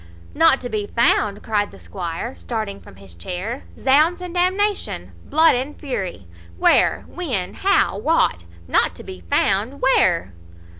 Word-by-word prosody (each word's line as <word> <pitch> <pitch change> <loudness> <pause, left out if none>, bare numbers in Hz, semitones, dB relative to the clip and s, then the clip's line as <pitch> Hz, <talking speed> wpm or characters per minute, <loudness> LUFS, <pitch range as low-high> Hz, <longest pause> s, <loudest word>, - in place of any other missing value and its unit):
"Not 325 -4 +5
to 250 - -4
be 210 -2 -3
found!" 215 -4 +1
cries 205 -2 0
the - - -15
squire, 180 +6 -5
starting 215 -4 -5
from - - -15
his 95 -2 -13
chair; 180 - -6
"Zounds 305 +7 +3
and 360 -1 -7
d 360 0 +3
nation! 410 +2 -2
Blood 320 +2 +4
and 265 +4 -3
fury! 195 - -4 0.3
Where, - - +3
when, 255 - -3
how, 395 +1 +2
what 315 - +1 0.2
Not - - +2
to - - -10
be 90 - -9
found! 210 - +1
Where?" 170 - +2
235 Hz, 150 wpm, -21 LUFS, 185-315 Hz, 0.3 s, Not